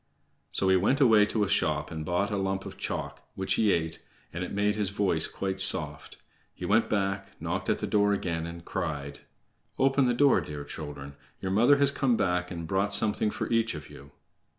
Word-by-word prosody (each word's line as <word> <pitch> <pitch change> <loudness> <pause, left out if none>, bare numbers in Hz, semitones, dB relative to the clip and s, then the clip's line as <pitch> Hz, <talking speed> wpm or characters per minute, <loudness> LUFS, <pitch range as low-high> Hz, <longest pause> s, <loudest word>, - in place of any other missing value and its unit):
So 95 - 0
he 95 - +5
went 120 +10 +2
away 110 -6 +5
to 105 0 0
a - - 0
shop 75 -6 0
and 80 -1 -5
bought 90 +5 -1
a - - 0
lump 95 0 -2
of - - -8
chalk, - - -5
which 95 0 0
he 110 -3 +3
ate, 80 -2 -1 0.3
and 90 +2 -3
it 90 - -6
made 105 +1 +1
his 105 -3 -1
voice 100 -5 0
quite 95 -1 -3
soft. - - +2 0.4
He - - -6
went 110 +3 +2
back, 100 -1 -2
knocked - - -3
at - - +2
the - - -3
door 105 -1 +2
again, 85 -5 -2
and 85 0 -9
cried: 75 -7 -4 0.6
"Open 135 0 +3
the 120 - +1
door, 140 -6 +4
dear 75 -1 -7
children. 70 -2 -8 0.2
Your 95 - -3
mother 120 +8 +5
has 140 0 +3
come 135 -4 +1
back 90 0 0
and 85 -3 -6
brought 100 +3 +1
something 105 0 +1
for - - -4
each 115 -4 +1
of 75 -1 -9
you." 70 - -13
95 Hz, 205 wpm, -28 LUFS, 85-105 Hz, 0.6 s, he